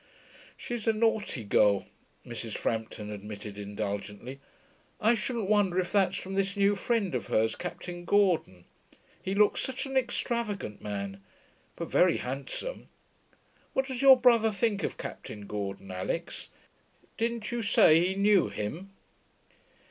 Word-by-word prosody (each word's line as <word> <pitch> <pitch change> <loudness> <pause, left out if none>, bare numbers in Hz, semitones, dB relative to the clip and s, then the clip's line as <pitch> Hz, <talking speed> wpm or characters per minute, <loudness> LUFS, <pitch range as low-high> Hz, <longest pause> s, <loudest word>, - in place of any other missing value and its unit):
'She's 240 -3 -5
a 225 - +5
naughty 215 - 0
girl,' 100 -1 +3 0.4
Mrs. 115 -2 -5
Frampton 110 -2 -3
admitted 105 0 -7
indulgently. 105 +5 -5 0.6
'I 220 +2 +4
shouldn't 235 -3 -2
wonder 205 -3 +3
if 180 - -1
that's 195 -2 +2
from 190 - -6
this 195 +1 0
new 200 +1 +4
friend 205 - 0
of 120 -6 -2
hers, 110 +1 +2
Captain 175 0 -6
Gordon. 175 - +2 0.6
He 190 +1 -2
looks 210 0 +4
such 265 +1 -3
an 270 0 -6
extravagant 235 - -1
man. 100 -1 -5 0.5
But - - -6
very - - +4
handsome.... 135 - -5 0.8
What 265 - +1
does 260 -1 -4
your 265 -2 +8
brother 235 -3 +5
think 205 0 0
of - - -3
Captain 105 -1 -7
Gordon, 100 -2 -5
Alix? 95 0 -4 0.7
Didn't 230 -1 -2
you 240 0 -1
say 170 -6 +5
he 185 +2 0
knew 200 -1 +4
him?' 170 - -5
190 Hz, 135 wpm, -29 LUFS, -, 0.8 s, your